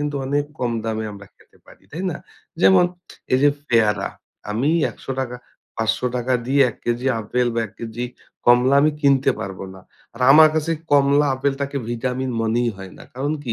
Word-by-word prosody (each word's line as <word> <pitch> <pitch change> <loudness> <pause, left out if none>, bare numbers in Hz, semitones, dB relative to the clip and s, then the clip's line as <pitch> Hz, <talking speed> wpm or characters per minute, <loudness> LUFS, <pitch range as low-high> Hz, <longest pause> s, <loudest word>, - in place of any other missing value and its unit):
কিন্তু 145 -1 -2
অনেক 145 +2 0
কম 125 -1 -1
দামে 110 -1 -2
আমরা 100 0 -12
খেতে - - -25
পারি। - - -18
তাই 165 +5 -6
না? - - -4 0.4
যেমন 185 -1 +6 0.5
এইযে 140 +3 +4 0.2
পেয়ারা, 105 -4 +2 0.4
আমি 115 +7 0 0.2
৳১০০ 130 -2 -5 0.4
৳৫০০ 125 +3 0
দিয়ে 140 +2 +4
১ - - -16
কেজি 120 +2 -1
আপেল 125 +3 -1
বা, 115 - 0
১ 100 - -19
কেজি 115 +1 -5 0.4
কমলা 125 +2 +5
আমি 150 +2 +4
কিনতে 140 -2 +3
পারবো 95 0 -6
না। 95 - -13 0.3
আর 115 - -13
আমার 155 +2 +8
কাছে 155 +1 -1 0.2
কমলা, 145 +1 +4
আপেলটাকে 140 +1 -2
ভিটামিন 125 +2 -2
মনেই 115 +2 +1
হয় 95 -1 -10
না। - - -12
কারণ 140 +4 -2
কি? 120 - -2
125 Hz, 170 wpm, -21 LUFS, 115-140 Hz, 0.5 s, আমার